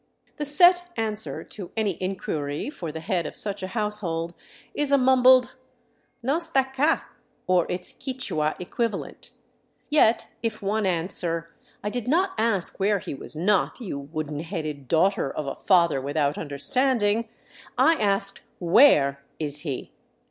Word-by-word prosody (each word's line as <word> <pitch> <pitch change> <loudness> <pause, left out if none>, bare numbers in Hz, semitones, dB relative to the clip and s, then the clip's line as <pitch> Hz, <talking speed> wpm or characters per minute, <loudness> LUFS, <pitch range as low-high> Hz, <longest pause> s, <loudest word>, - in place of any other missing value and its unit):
The 295 - -3
set 355 +4 +6
answer 220 -1 -1
to 195 -5 -9
any 205 -6 -1
inquiry 160 - -3
for 170 - -6
the 160 +1 -7
head 175 -3 -1
of - - -9
such 205 -1 -1
a 185 - -3
household 190 -6 -2 0.4
is 295 -1 0
a 280 - +6
mumbled, 255 -1 +5 0.3
" - - -43
No 275 +7 +1
'sta 325 -6 +2
'ca," 295 +5 +1 0.4
or 180 -2 +2
its 180 - -4
Quichua 205 - -2
equivalent. 205 +3 -4 0.6
Yet 240 -7 +4 0.2
if 225 -2 -2
one 205 +1 0
answer, 165 -1 0 0.2
" - - -34
I 210 - -2
did 245 -1 -4
not 365 +8 +2
ask 220 -6 0
where 200 +1 +2
he 180 - -6
was 140 - -7
not, 190 +8 +1
you 190 - -5
wooden 150 +1 -5
headed 155 -5 -5
daughter 165 +1 +2
of 150 - -4
a 135 - -3
father 170 -7 +3
without 145 +1 0
understanding; 215 - 0 0.5
I 325 - +5
asked, 200 -7 0 0.2
where 165 - +4
is 150 -2 0
he?" 145 -5 -5
195 Hz, 150 wpm, -25 LUFS, 160-245 Hz, 0.6 s, set